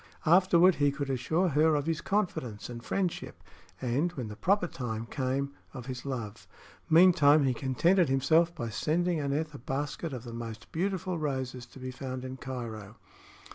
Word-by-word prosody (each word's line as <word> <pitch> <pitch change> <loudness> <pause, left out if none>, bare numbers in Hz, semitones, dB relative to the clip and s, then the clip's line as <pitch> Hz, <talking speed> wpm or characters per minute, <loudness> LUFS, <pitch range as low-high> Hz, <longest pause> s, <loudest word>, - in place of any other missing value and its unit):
Afterward 180 +1 +6
he 145 0 +4
could 140 -1 -3
assure 160 +9 +1
her 155 +1 +3
of 145 -1 0
his 165 0 -1
confidence 155 - -2
and 120 -1 -8
friendship, 185 +2 -3 0.4
and, 135 +8 0
when 125 -9 -5
the 105 - -7
proper 195 - +2
time 115 -8 -4
came, 135 +2 -2 0.2
of 125 -3 -7
his 130 +1 -6
love. 115 -6 -5 0.4
Meantime 160 -3 +6
he 130 -2 +2
contented 165 +8 +2
himself 160 +6 +3
by 120 -8 -4
sending 165 +8 0
Aneth 150 +2 -1
a 145 - -8
basket 145 +6 -3
of 125 -3 -6
the 120 -2 -8
most 115 -1 -7
beautiful 185 0 -2
roses 130 -4 -3
to 120 - -16
be 130 0 -5
found 130 0 -6
in 130 0 -6
Cairo. 115 -5 -6
140 Hz, 170 wpm, -30 LUFS, 125-165 Hz, 0.4 s, Afterward